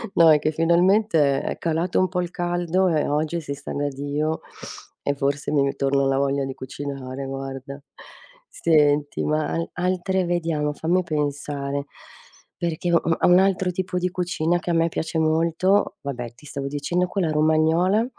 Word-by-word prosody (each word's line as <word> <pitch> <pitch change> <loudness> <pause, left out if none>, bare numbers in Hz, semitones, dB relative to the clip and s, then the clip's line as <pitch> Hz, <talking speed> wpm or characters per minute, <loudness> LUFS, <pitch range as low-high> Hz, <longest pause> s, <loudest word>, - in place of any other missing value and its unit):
No 165 -1 +7
è 155 - +6
che 155 - 0
finalmente 170 -2 +3
è - - -4
calato 165 +2 0
un 185 - +3
po' 180 0 -1
il 175 - -3
caldo 175 +1 0
e 155 -4 +1
oggi 155 +3 0
si 140 -2 -5
sta 140 0 -8
da 145 0 -1
Dio 145 +3 -2 0.6
e 140 - -1
forse 140 +1 -1
mi 145 -2 +3
ritorna 140 0 +1
la 135 0 +1
voglia 140 0 0
di 135 - -5
cucinare 135 0 -6
guarda. 135 +1 -6 0.7
Senti 150 -3 +2
ma 155 0 0
hai 165 - -1
altre 185 +1 0
vediamo 165 -4 -1
fammi 175 +5 0
pensare, 145 -2 -2 0.7
perché 170 0 -2
u - - +7 0.2
a - - +1
un 180 +1 +7
altro 190 -1 +2
tipo 180 0 -3
di 180 0 0
cucina 175 -1 0
che 175 - -6
a - - +2
me 165 0 +3
piace 160 0 -3
molto 165 +5 +2
vabbè 125 -4 -5
ti 150 - -18
stavo 140 -1 -5
dicendo 145 +6 -1
quella 180 -4 -1
romagnola, 160 +7 +3
155 Hz, 170 wpm, -23 LUFS, 140-175 Hz, 0.7 s, No